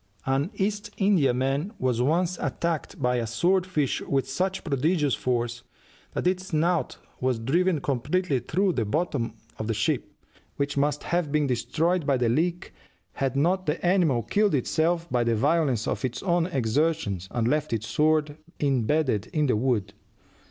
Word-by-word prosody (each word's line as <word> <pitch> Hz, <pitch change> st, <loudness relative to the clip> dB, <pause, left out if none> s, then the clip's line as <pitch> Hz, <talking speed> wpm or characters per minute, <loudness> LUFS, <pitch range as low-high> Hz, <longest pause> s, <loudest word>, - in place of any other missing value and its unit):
An 135 Hz, +5 st, +1 dB
East 205 Hz, +1 st, -1 dB
Indiaman 145 Hz, -, +2 dB
was 125 Hz, -2 st, 0 dB
once 170 Hz, +6 st, +1 dB
attacked 170 Hz, -3 st, -2 dB
by 125 Hz, -2 st, +1 dB
a 115 Hz, -2 st, -1 dB
sword 180 Hz, -, +1 dB
fish 150 Hz, -7 st, 0 dB
with 135 Hz, -1 st, -1 dB
such 185 Hz, +7 st, -2 dB
prodigious 150 Hz, 0 st, +1 dB
force 120 Hz, -1 st, -1 dB, 0.5 s
that -, -, -2 dB
its 185 Hz, +1 st, 0 dB
"snout" 170 Hz, +2 st, 0 dB, 0.2 s
was 130 Hz, -2 st, +1 dB
driven 165 Hz, +9 st, +1 dB
completely 140 Hz, +3 st, 0 dB
through 190 Hz, -, 0 dB
the 120 Hz, -, 0 dB
bottom 120 Hz, -2 st, -1 dB, 0.2 s
of 110 Hz, -, -3 dB
the 115 Hz, -, 0 dB
ship, 105 Hz, -, -1 dB, 0.4 s
which 140 Hz, 0 st, -2 dB
must 145 Hz, +1 st, 0 dB
have 170 Hz, -4 st, -1 dB
been 150 Hz, 0 st, +2 dB
destroyed 160 Hz, +6 st, 0 dB
by 140 Hz, -2 st, +3 dB
the 120 Hz, -2 st, +1 dB
leak 170 Hz, +8 st, -1 dB, 0.4 s
had 135 Hz, -2 st, -1 dB
not 180 Hz, +6 st, +1 dB
the 150 Hz, +4 st, -1 dB
animal 170 Hz, -10 st, +3 dB
killed 205 Hz, -, +2 dB
itself 165 Hz, +5 st, 0 dB
by 120 Hz, -1 st, +2 dB
the 115 Hz, -1 st, +1 dB
violence 140 Hz, -2 st, +1 dB
of -, -, -2 dB
its 125 Hz, -2 st, -3 dB
own 175 Hz, -2 st, +2 dB
exertions, 130 Hz, -, 0 dB
and 120 Hz, -2 st, -1 dB
left 150 Hz, +3 st, 0 dB
its 110 Hz, -2 st, -1 dB
sword 150 Hz, +1 st, +1 dB, 0.2 s
imbedded 135 Hz, -4 st, +1 dB
in 150 Hz, -2 st, 0 dB
the 125 Hz, -, +2 dB
wood. 105 Hz, -4 st, 0 dB
145 Hz, 160 wpm, -26 LUFS, 125-170 Hz, 0.5 s, by